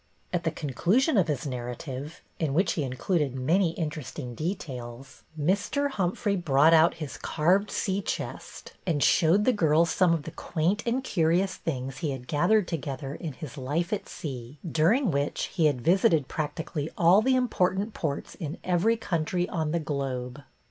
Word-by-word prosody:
At 170 -1 -1
the - - +3
conclusion 175 - +1
of 190 -6 +4
his 150 -3 -2
narrative, 130 +3 -6 0.2
in 150 -4 0
which 185 +2 +3
he 160 - -2
included 140 +2 -1
many 165 +7 +2
interesting 150 -6 -5
details, 135 - -6 0.2
Mr. 200 - +1
Humphrey 200 0 0
brought 160 -3 +4
out 165 +1 +5
his 155 -4 -6
carved 185 +6 +1
sea 195 0 -1
BETTY - - -3
BAIRD - - -1 0.2
236 - - -12
chest - - -32
and 150 -5 +1
showed 180 +6 +4
the 255 - +4
girls 165 -4 +3
some 185 -3 +3
of 155 - -4
the 160 - -7
quaint 170 +5 -1
and 250 +3 0
curious 180 -3 +1
things 135 -3 -4
he 160 - -1
had 130 -2 -5
gathered 190 - +3
together 140 -3 -4
in 160 -3 -6
his 145 +1 -8
life 155 +8 -1
at 205 - -3
sea, 130 -2 -7
during 180 - +3
which 140 0 -1
he 165 -4 +3
had 135 -5 0
visited 165 -2 +3
practically 155 0 -3
all 180 +5 +6
the 260 +3 +3
important 210 -4 +1
ports 145 -4 -3
in 155 -3 -6
every 185 +6 +2
country 175 -3 -1
on 160 -3 -1
the 170 - +1
globe. 135 -3 -3
160 Hz, 175 wpm, -27 LUFS, 140-185 Hz, 0.2 s, all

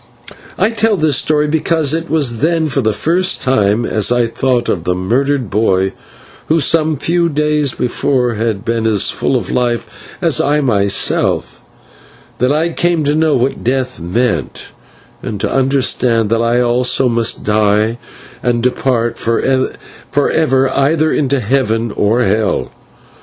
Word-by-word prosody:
I - - +2
tell 225 -2 +1
this 155 -4 +2
story 150 -1 +1
because 160 -1 0
it 165 +1 -3
was 135 -8 0
then 165 +3 +1
for 140 -2 -1
the 110 -2 +1
first 170 - 0
time, 110 -3 +1
as 110 +1 0
I 120 -1 +2
thought 125 +1 -1
of 85 - -1
the 90 - -1
murdered 125 +5 -1
boy, 95 -3 +1 0.5
who 160 +1 +2
some 155 +1 +1
few 170 +4 0
days 150 -2 0
before 125 0 0
had 110 -1 -3
been 115 -1 -1
as 105 -3 +2
full - - -1
of - - -2
life 120 -1 0 0.3
as 165 -7 +2
I 145 +2 +1
was 140 - -1
myself, 100 -4 0 0.8
that 125 +2 +2
I 160 +3 +1
came 170 -2 0
to 145 0 +1
know 155 -1 +2
what 130 +2 -1
death 130 +1 -2
meant, 90 - -2 0.6
and 105 - -5
to - - -2
understand 130 -4 +1
that 115 0 +2
I 120 +1 +1
also 125 +2 +2
must 115 -2 0
die 105 +2 +1 0.4
and 120 -1 0
depart 120 -2 0
for 115 0 0
ever 135 +1 -1
either 155 +3 +2
into 140 -2 0
heaven 115 -1 0
or 110 +4 +1
hell. 105 +1 0
125 Hz, 150 wpm, -15 LUFS, 115-150 Hz, 0.8 s, I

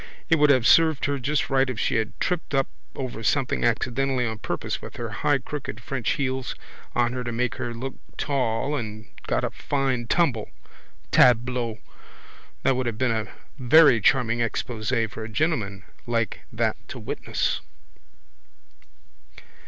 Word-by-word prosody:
It 165 - +5
would 150 0 +5
have 130 -4 +4
served 160 -1 +5
her 140 -1 0
just 145 +3 -1
right 135 -1 +3
if 125 - -4
she - - +1
had 110 -1 -3
tripped 175 -5 -1
up 135 0 +2 0.3
over 130 -4 -5
something 130 +3 +1
accidentally 125 +2 +1
on 110 -1 -3
purpose - - -3
with - - -9
her - - -4
high - - +2
crooked 145 -6 -6
French 120 0 -1
heels 130 -2 -2 0.4
on 120 0 +2
her 125 -1 -3
to 120 - -3
make 125 +2 -1
her 120 - -3
look 130 +3 -5 0.2
tall 135 0 0
and 110 -4 -5 0.2
got - - 0
a - - -1
fine 135 -4 -1
tumble. 130 -11 +1 0.6
Tableau! 120 -2 +4 0.9
That 135 - +3
would 130 -1 -1
have 115 -2 -2
been 130 0 +1
a 110 -1 -1 0.3
very 130 -2 +6
charming 120 0 +3
exposé 115 0 -1
for 110 +1 -7
a 110 - -6
gentleman 110 - -1 0.2
like 115 -1 0
that - - 0
to - - -7
witness. - - -2
125 Hz, 155 wpm, -25 LUFS, 115-135 Hz, 0.9 s, very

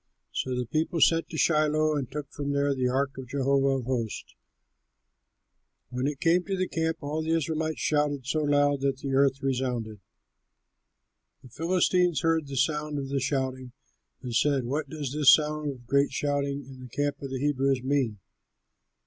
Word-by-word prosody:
So 130 -1 -2
the 125 - -1
people 160 +5 -1
sent 165 +1 +3
to 160 - -6
Shiloh 155 -1 +2
and 135 -4 -2
took 145 0 -6
from 140 0 -3
there 140 0 +2
the 130 -2 0
ark 135 +1 -1
of 130 - -8
Jehovah 135 0 +2
of - - -10
hosts. 120 -4 -3 1.6
When 125 +2 -1
it 145 -2 -3
came 175 +1 +3
to 195 -1 -2
the 185 0 0
camp, 160 0 -1
all 150 +2 -2
the 160 +1 0
Israelites 160 0 -2
shouted 145 -3 0
so 155 +3 0
loud 145 -1 +2
that 135 -1 0
the 135 0 -4
earth 135 +1 +2
resounded. 125 -5 -2 1.4
The 130 - -13
Philistines 175 +2 +1
heard 165 -2 +1
the 140 -1 -5
sound 150 +2 0
of 135 -1 -4
the 140 0 0
shouting 130 -2 -2 0.5
and 125 -2 -5
said, 140 -1 +2
"What 140 +3 -2
does 145 -3 -4
this 145 -2 +7
sound 150 -1 -2
of 125 -3 -8
great 140 +3 +2
shouting 140 -1 -1
in 130 -1 -12
the 125 -1 -10
camp 145 +4 -2
of 140 - -5
the 130 - -3
Hebrews 135 -2 +1
mean?" 130 -6 0
140 Hz, 175 wpm, -27 LUFS, 130-150 Hz, 1.6 s, this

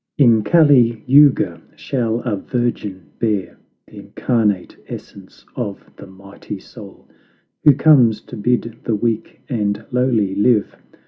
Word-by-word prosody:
"In 115 -6 +4
Cali 125 -7 +4
Youga 130 - +4
shall 120 -3 -2
a 120 -5 -2
virgin 100 - -4
bear 105 -5 -2 0.3
The - - -13
Incarnate 105 -6 -1
Essence 95 -1 -11
of 105 -6 -6
the - - -12
mighty 100 +2 -10
Soul, 100 0 -14 0.6
Who 145 -3 +7
comes 125 -8 +4
to - - -11
bid 115 +1 -2
the 115 - 0
weak 110 +1 -3
and 105 -5 -2
lowly 120 -6 +1
live. 105 +1 +1
115 Hz, 125 wpm, -18 LUFS, 100-125 Hz, 0.6 s, Who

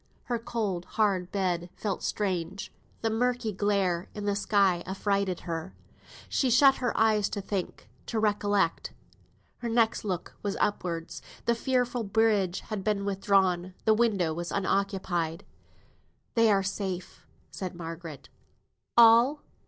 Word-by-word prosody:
Her 240 -1 -2
cold, 210 -7 -3
hard 195 -4 +1
bed 180 -3 -1
felt 205 -3 -3
strange; 190 -2 -2 0.3
the 225 - 0
murky 245 0 0
glare 190 -3 0
in 210 -1 -5
the 205 -1 +1
sky 200 -3 +2
affrighted 195 -1 -1
her. 165 +1 -5 0.5
She 265 - +1
shut 270 +3 +6
her 245 -2 -1
eyes 215 -2 +3
to - - -3
think, 195 -2 -4 0.2
to 230 - -2
recollect. 205 -4 +1 0.7
Her 235 - -3
next 230 -1 +2
look 185 -5 -3
was 200 -1 -2
upwards. 170 -5 -2 0.2
The 235 - +3
fearful 245 0 0
bridge 205 -3 +1
had 210 -3 -5
been 205 -1 0
withdrawn; 190 -2 +1
the 220 - +5
window 205 -8 +2
was 170 +1 -5
unoccupied. 190 -4 -1 0.9
"They 230 -2 +4
are 195 -1 +3
safe," 190 -2 -5 0.2
said 185 -2 -5
Margaret. 165 -3 -8 0.7
"All? 235 +5 +6
200 Hz, 130 wpm, -28 LUFS, 180-220 Hz, 0.9 s, shut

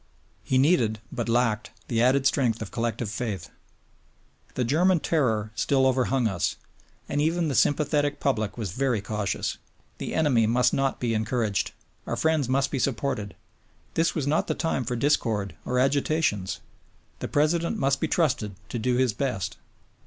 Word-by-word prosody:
He 130 - +1
needed, 130 -7 +3
but 120 -1 -3
lacked, 115 -2 +1 0.2
the 115 -1 +1
added 130 +2 +3
strength 125 -4 +2
of 100 - -9
collective 115 0 -2
faith. 110 -4 -4 1.0
The 125 - 0
German 170 +8 +3
terror 115 -10 0
still 130 +5 +2
overhung 130 -1 +2
us, 90 -6 -1 0.5
and 145 - 0
even 165 +1 +1
the - - -1
sympathetic 145 +1 +2
public 110 -7 -1
was 105 -6 -3
very 125 +1 0
cautious; 105 0 -2 0.4
the - - -4
enemy 130 -8 +3
must 125 +2 +3
not 135 0 0
be 120 -2 0
encouraged, 110 -1 0 0.4
our - - -1
friends 160 -5 +1
must 135 +1 +1
be 135 - -1
supported, 120 -5 -1 0.6
this 165 +1 +1
was 155 -5 -1
not 150 +3 +1
the - - -1
time 165 -6 -1
for 125 +2 -2
discord 115 -6 +1
or 125 - -1
agitations, 135 - +1 0.6
the - - -3
President 170 +7 +1
must 135 -7 +1
be 160 - +1
trusted 135 - 0
to 120 - -3
do 125 +2 +1
his 125 -3 +2
best. 125 -5 -2
130 Hz, 160 wpm, -26 LUFS, 110-145 Hz, 1.0 s, needed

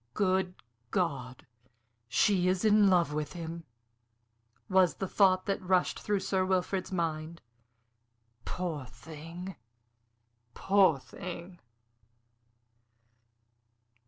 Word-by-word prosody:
"Good 185 -2 +1 0.3
God! 135 -9 -2 0.6
she 180 - +2
is 185 +3 +1
in 210 -1 +6
love 175 -5 +3
with 150 0 -3
him!" 165 -1 -6 1.0
was 185 -2 +4
the 195 - -3
thought 185 -1 +3
that 195 -1 -1
rushed 185 -1 +1
through 205 -2 -1
Sir 190 0 0
Wilfrid's 185 0 -1
mind. 165 -2 -2 1.0
"Poor 170 -6 -4
thing! 165 +8 -9 1.0
Poor 195 -6 +4
thing!" 170 +7 -9
180 Hz, 90 wpm, -30 LUFS, 165-190 Hz, 1.0 s, in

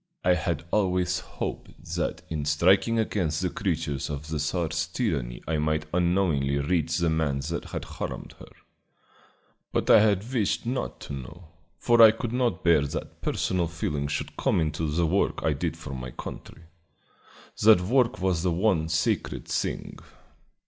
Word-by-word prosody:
I 90 - +5
had 80 -1 -1
always 90 -3 +1
hoped 90 - -7
that - - -2
in 75 -2 -3
striking 95 +10 +3
against 90 -8 0
the 90 -1 -1
creatures 80 -8 -2
of 75 +1 -5
the 80 -1 -2
Czar's 85 +2 -1
tyranny 80 - -2
I 80 -1 0
might 75 0 0
unknowingly 85 -6 +2
reach 80 +2 0
the 85 -2 +1
man 75 -4 0
that - - -3
had - - -5
harmed - - -6
her; - - -12 1.2
but - - +1
I - - +9
had 105 +3 +1
wished 110 -4 0
not 125 +2 -3
to - - -7
know, 80 +5 -9 0.3
for 120 -1 +4
I 110 - +11
could 115 +1 -3
not 120 -8 0
bear 85 -4 +5
that 70 -1 -5
personal 90 -2 0
feeling 75 -4 -2
should 75 - -4
come - - +2
into 80 0 -1
the 85 +3 +1
work 95 +5 0
I - - +2
did - - -3
for 70 - -8
my 65 -1 -5
country. 80 - -9 1.0
That 110 -3 +7
work 120 +3 +2
was 95 -3 +1
the 90 - +1
one 85 -3 +1
sacred 80 -1 -1
thing. - - -3
85 Hz, 160 wpm, -26 LUFS, 75-95 Hz, 1.2 s, I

